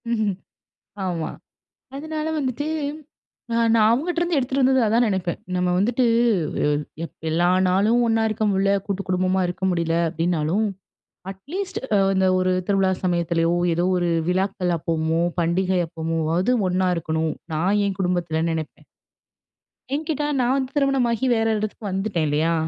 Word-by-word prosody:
ம்ஹ்ம். 215 Hz, -4 st, 0 dB, 0.7 s
ஆமா. 170 Hz, -3 st, -2 dB, 0.7 s
அதனால 310 Hz, +1 st, -4 dB
வந்துட்டு 265 Hz, +2 st, -2 dB, 0.9 s
அ -, -, 0 dB, 0.2 s
நான் 215 Hz, -1 st, +5 dB
அவங்கட்டிருந்து 340 Hz, +6 st, 0 dB
எடுத்துட்டு 270 Hz, +1 st, 0 dB
வந்தது 260 Hz, 0 st, +4 dB
அதான் 230 Hz, +3 st, +3 dB
நினைப்பேன். 190 Hz, -4 st, -1 dB, 0.2 s
நம்ம 180 Hz, 0 st, +1 dB
வந்துட்டு 235 Hz, +6 st, +2 dB, 0.6 s
எ -, -, +3 dB, 0.4 s
எப் -, -, -10 dB, 0.2 s
எல்லா 170 Hz, +2 st, +2 dB, 0.2 s
நாளும் 210 Hz, +6 st, +3 dB
ஒண்ணா 225 Hz, -1 st, +2 dB
இருக்க 215 Hz, 0 st, -2 dB
முடில. 195 Hz, 0 st, +2 dB
கூட்டுக்குடும்பமா 185 Hz, -1 st, 0 dB
இருக்க 180 Hz, +2 st, -4 dB
முடில. 170 Hz, -2 st, 0 dB
அப்படினாலும், 170 Hz, +4 st, 0 dB, 0.7 s
அட்லீஸ்ட் 355 Hz, -, -5 dB, 0.2 s
அ -, -, +5 dB, 0.2 s
அந்த 190 Hz, 0 st, +2 dB
ஒரு 185 Hz, 0 st, +1 dB, 0.2 s
திருவிழா 195 Hz, -2 st, +2 dB
சமயத்திலயோ, 170 Hz, -1 st, +1 dB, 0.2 s
ஏதோ 170 Hz, +2 st, 0 dB
ஒரு 175 Hz, -1 st, 0 dB, 0.2 s
விழாக்கள் 185 Hz, -1 st, 0 dB
அப்பமோ, 160 Hz, 0 st, -1 dB, 0.2 s
பண்டிகை 180 Hz, +2 st, +1 dB
அப்பமோவது 165 Hz, +5 st, -1 dB, 0.2 s
ஒண்ணா 185 Hz, 0 st, +1 dB
இருக்கணும், 160 Hz, -1 st, -1 dB, 0.2 s
நான் 185 Hz, +7 st, +1 dB
என் 195 Hz, -2 st, -3 dB
குடும்பத்துலன்னு 170 Hz, -3 st, 0 dB
நெனப்பேன். 160 Hz, -1 st, -6 dB, 1.1 s
எங்கிட்ட 305 Hz, -1 st, -2 dB, 0.2 s
நான் 250 Hz, +1 st, +2 dB
வந்து 265 Hz, -1 st, -2 dB
திருமணமாகி 265 Hz, -4 st, +1 dB
வேற 225 Hz, 0 st, +1 dB
இடத்துக்கு 215 Hz, +1 st, -5 dB
வந்துட்டேன், 190 Hz, -4 st, -1 dB
இல்லையா, 155 Hz, +3 st, +1 dB
190 Hz, 130 wpm, -23 LUFS, 170-230 Hz, 1.1 s, நான்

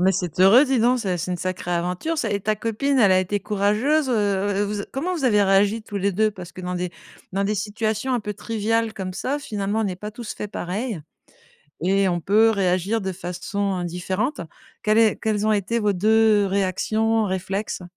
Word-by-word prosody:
Mais 190 Hz, +1 st, +4 dB
c'est 180 Hz, -2 st, -3 dB
heureux, 210 Hz, +9 st, +7 dB
dis 265 Hz, -3 st, +1 dB
donc 245 Hz, +2 st, +3 dB
ça, 185 Hz, -5 st, -1 dB
c'est 170 Hz, -, -3 dB
une -, -, -1 dB
sacrée 180 Hz, 0 st, -3 dB
aventure, 180 Hz, -, -2 dB
ça, 225 Hz, -7 st, -1 dB
et 200 Hz, -, 0 dB
ta 215 Hz, +2 st, 0 dB
copine, 230 Hz, +6 st, -1 dB
elle 200 Hz, -4 st, +5 dB
a 185 Hz, -, +5 dB
été 190 Hz, +2 st, -1 dB
courageuse, 215 Hz, +9 st, +1 dB
heu -, -, +1 dB, 0.5 s
heu, 205 Hz, -, +2 dB
vous 205 Hz, 0 st, -3 dB
a -, -, -6 dB
comment 325 Hz, +8 st, -2 dB
vous 295 Hz, -6 st, -3 dB
avez 210 Hz, -4 st, +4 dB
réagi 200 Hz, +3 st, +3 dB
tous 210 Hz, -1 st, -7 dB
les 200 Hz, +1 st, 0 dB
2? 215 Hz, +3 st, +2 dB
Parce 180 Hz, -4 st, -10 dB
que 185 Hz, -, -9 dB
dans 180 Hz, 0 st, -4 dB
des 180 Hz, -1 st, -3 dB, 0.4 s
dans 195 Hz, +1 st, 0 dB
des 205 Hz, +2 st, 0 dB
situations 215 Hz, +4 st, -2 dB
un 240 Hz, -, 0 dB
peu 210 Hz, 0 st, -4 dB
triviales 225 Hz, +1 st, -1 dB
comme 190 Hz, -3 st, -5 dB
ça, 265 Hz, +10 st, -2 dB
finalement, 210 Hz, -4 st, -2 dB
on 220 Hz, -, 0 dB
est 180 Hz, -, -4 dB
pas 210 Hz, +3 st, -7 dB
tous 230 Hz, 0 st, -7 dB
faits 210 Hz, -, -6 dB
pareil 200 Hz, +2 st, -3 dB, 0.8 s
et 195 Hz, +2 st, +2 dB
on 175 Hz, -1 st, -1 dB
peut 215 Hz, +6 st, +4 dB
réagir 195 Hz, +1 st, +1 dB
de 190 Hz, -1 st, -3 dB
façon 185 Hz, +2 st, -3 dB
différente. 190 Hz, -, -2 dB, 0.4 s
Quelle 215 Hz, +1 st, +3 dB
est 220 Hz, -2 st, +4 dB
quelles 215 Hz, -1 st, -1 dB
ont 215 Hz, -, +3 dB
été 210 Hz, +3 st, 0 dB
vos 210 Hz, -3 st, +1 dB
2 215 Hz, +2 st, +4 dB
réactions, 215 Hz, +4 st, +1 dB
réflexes? 190 Hz, +1 st, -3 dB
205 Hz, 215 wpm, -23 LUFS, 185-225 Hz, 0.8 s, heureux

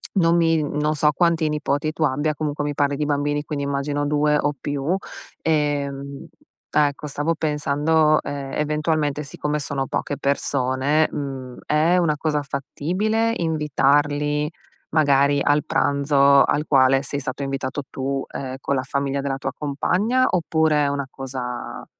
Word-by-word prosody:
non 170 Hz, -3 st, +4 dB
mi 165 Hz, -2 st, +3 dB
non 150 Hz, +1 st, -1 dB
so 150 Hz, 0 st, +3 dB
quanti 170 Hz, 0 st, +2 dB
nipoti 150 Hz, 0 st, -1 dB
tu 160 Hz, -, -2 dB
abbia, 150 Hz, +2 st, 0 dB
comunque 150 Hz, -1 st, -2 dB
mi 145 Hz, -, -2 dB
parli 145 Hz, 0 st, 0 dB
di 150 Hz, -, -1 dB
bambini, 145 Hz, 0 st, 0 dB
quindi 145 Hz, -2 st, -3 dB
immagino 140 Hz, +1 st, -1 dB
2 150 Hz, 0 st, +2 dB
o 145 Hz, 0 st, 0 dB
più, 145 Hz, +5 st, -2 dB, 0.5 s
ehm, 140 Hz, -3 st, -1 dB, 0.5 s
ecco, 145 Hz, -1 st, +1 dB
stavo 150 Hz, +3 st, -1 dB
pensando, 150 Hz, +1 st, +2 dB
ehm, 140 Hz, -1 st, -5 dB
eventualmente 150 Hz, -1 st, 0 dB
siccome 150 Hz, +1 st, -3 dB
sono 140 Hz, -2 st, -3 dB
poche 145 Hz, -, -2 dB
persone, 140 Hz, +2 st, +1 dB
mhmm, 130 Hz, -3 st, -5 dB
è 160 Hz, +4 st, +3 dB
una 165 Hz, -4 st, +2 dB
cosa 150 Hz, 0 st, 0 dB
fattibile 185 Hz, +11 st, -1 dB
invitarli, 150 Hz, -1 st, +1 dB, 0.4 s
magari, 140 Hz, -2 st, +3 dB
al 145 Hz, 0 st, +2 dB
pranzo 140 Hz, 0 st, +3 dB
al 150 Hz, -, +1 dB
quale 135 Hz, -1 st, +4 dB
sei 145 Hz, 0 st, -3 dB
stato 140 Hz, 0 st, -4 dB
invitato 135 Hz, +1 st, -3 dB
tu, 135 Hz, 0 st, -3 dB
ehm, 130 Hz, -1 st, -5 dB
con 140 Hz, -, 0 dB
la 130 Hz, -, -1 dB
famiglia 140 Hz, +1 st, -2 dB
della 135 Hz, -1 st, -2 dB
tua -, -, -3 dB
compagna, 195 Hz, -, +1 dB
oppure 160 Hz, -3 st, +2 dB
è -, -, +1 dB
una 140 Hz, -1 st, -2 dB
cosa 130 Hz, -2 st, -6 dB
145 Hz, 145 wpm, -22 LUFS, 140-155 Hz, 0.5 s, non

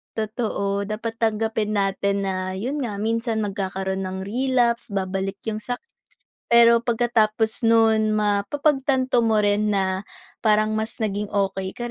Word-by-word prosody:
Totoo, 210 Hz, -3 st, -2 dB
dapat 225 Hz, +1 st, -5 dB
tanggapin 220 Hz, -1 st, 0 dB
natin 200 Hz, 0 st, 0 dB
na 185 Hz, -1 st, -2 dB
yon 260 Hz, +9 st, -3 dB
nga, 230 Hz, -6 st, -3 dB
minsan 225 Hz, +1 st, -1 dB
magkakaroon 190 Hz, -1 st, -3 dB
ng 190 Hz, 0 st, -4 dB
relapse, 240 Hz, +1 st, +1 dB
babalik 195 Hz, -1 st, -2 dB
yong 215 Hz, -1 st, -3 dB
sakit 245 Hz, -, -5 dB, 0.6 s
pero 235 Hz, 0 st, +6 dB
pagkatapos 225 Hz, -1 st, +1 dB
non 220 Hz, -1 st, +4 dB
mapapagtanto 260 Hz, +5 st, +1 dB
mo 220 Hz, -2 st, +3 dB
rin 205 Hz, +1 st, +2 dB
na 190 Hz, 0 st, -1 dB, 0.3 s
parang 215 Hz, -1 st, +2 dB
mas 220 Hz, +1 st, -3 dB
naging 210 Hz, -1 st, -1 dB
okey 195 Hz, -1 st, -2 dB
ka 240 Hz, 0 st, -5 dB
215 Hz, 130 wpm, -23 LUFS, 200-230 Hz, 0.6 s, pero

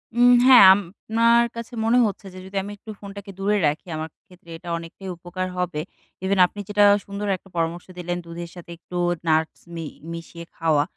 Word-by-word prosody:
উম 245 Hz, +1 st, +6 dB
হ্যাঁ 255 Hz, -6 st, +9 dB
আপনার 225 Hz, +5 st, +2 dB
কাছে 230 Hz, +1 st, -7 dB
মনে 230 Hz, +2 st, +4 dB
হচ্ছে 205 Hz, -1 st, -4 dB
যে 185 Hz, -, -9 dB
যদি 195 Hz, +1 st, -6 dB
আমি 205 Hz, -, -7 dB
একটু 220 Hz, -, -15 dB
ফোনটাকে 200 Hz, 0 st, -9 dB
দূরে 205 Hz, +2 st, +1 dB
রাখি, 150 Hz, +5 st, -3 dB
আমার 160 Hz, +1 st, -4 dB, 0.2 s
ক্ষেত্রে 180 Hz, -3 st, -19 dB
এটা 175 Hz, +1 st, -10 dB
অনেকটাই 170 Hz, +3 st, -9 dB
উপকার 180 Hz, +2 st, -5 dB
হবে। 180 Hz, -4 st, -2 dB, 0.4 s
ইভেন 190 Hz, 0 st, +1 dB
আপনি 205 Hz, -, -12 dB
যেটা 205 Hz, 0 st, +3 dB, 0.2 s
সুন্দর 200 Hz, +1 st, -5 dB
একটা 195 Hz, -, -21 dB
পরামর্শ 165 Hz, +1 st, -2 dB
দিলেন 175 Hz, 0 st, -3 dB
দুধের 170 Hz, 0 st, -7 dB
সাথে 175 Hz, -1 st, -11 dB
একটু 180 Hz, +1 st, -8 dB, 0.3 s
নাটস 160 Hz, 0 st, +1 dB, 0.2 s
মি 165 Hz, -1 st, -5 dB, 0.3 s
মিশিয়ে 170 Hz, 0 st, -9 dB
খাওয়া। 155 Hz, -3 st, +2 dB
185 Hz, 180 wpm, -23 LUFS, 170-205 Hz, 0.4 s, হ্যাঁ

